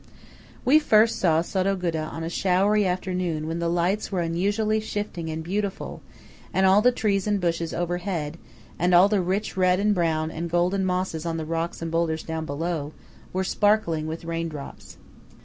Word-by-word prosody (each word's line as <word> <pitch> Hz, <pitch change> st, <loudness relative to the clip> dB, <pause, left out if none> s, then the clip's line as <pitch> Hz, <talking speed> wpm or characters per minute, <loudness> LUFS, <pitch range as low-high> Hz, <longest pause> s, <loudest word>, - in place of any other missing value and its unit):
We 285 Hz, +5 st, +6 dB
first 225 Hz, -6 st, +4 dB
saw 165 Hz, -2 st, +3 dB
Sottoguda 180 Hz, -4 st, -1 dB
on 165 Hz, -, -5 dB
a -, -, -3 dB
showery 195 Hz, +3 st, +2 dB
afternoon 180 Hz, -3 st, -2 dB
when 165 Hz, +1 st, -3 dB
the 170 Hz, 0 st, 0 dB
lights 175 Hz, +6 st, 0 dB
were 185 Hz, -3 st, 0 dB
unusually 205 Hz, +6 st, 0 dB
shifting 205 Hz, -6 st, -4 dB
and 160 Hz, 0 st, -4 dB
beautiful, 200 Hz, +3 st, -3 dB, 0.5 s
and 190 Hz, -, +2 dB
all 190 Hz, +2 st, +6 dB
the 250 Hz, -, +5 dB
trees 205 Hz, -4 st, 0 dB
and 205 Hz, -1 st, +1 dB
bushes 170 Hz, -2 st, -1 dB
overhead, 175 Hz, -2 st, -3 dB, 0.4 s
and 180 Hz, +1 st, +3 dB
all 180 Hz, +3 st, +7 dB
the 205 Hz, -2 st, +2 dB
rich 190 Hz, +4 st, -2 dB
red 185 Hz, 0 st, +3 dB
and 210 Hz, +1 st, +3 dB
brown 160 Hz, -3 st, 0 dB
and 170 Hz, +1 st, -4 dB
golden 180 Hz, +3 st, +1 dB
mosses 180 Hz, -3 st, -1 dB
on 165 Hz, -1 st, -2 dB
the 160 Hz, -, -4 dB
rocks 165 Hz, +1 st, -3 dB
and 165 Hz, -, -3 dB
boulders 165 Hz, -1 st, 0 dB
down 160 Hz, -1 st, -4 dB
below, 155 Hz, 0 st, -3 dB, 0.4 s
were 190 Hz, +1 st, -1 dB
sparkling 190 Hz, -6 st, +1 dB
with 160 Hz, +1 st, -6 dB
rain 165 Hz, 0 st, -2 dB
drops. 145 Hz, -3 st, -9 dB
175 Hz, 175 wpm, -25 LUFS, 165-195 Hz, 0.5 s, all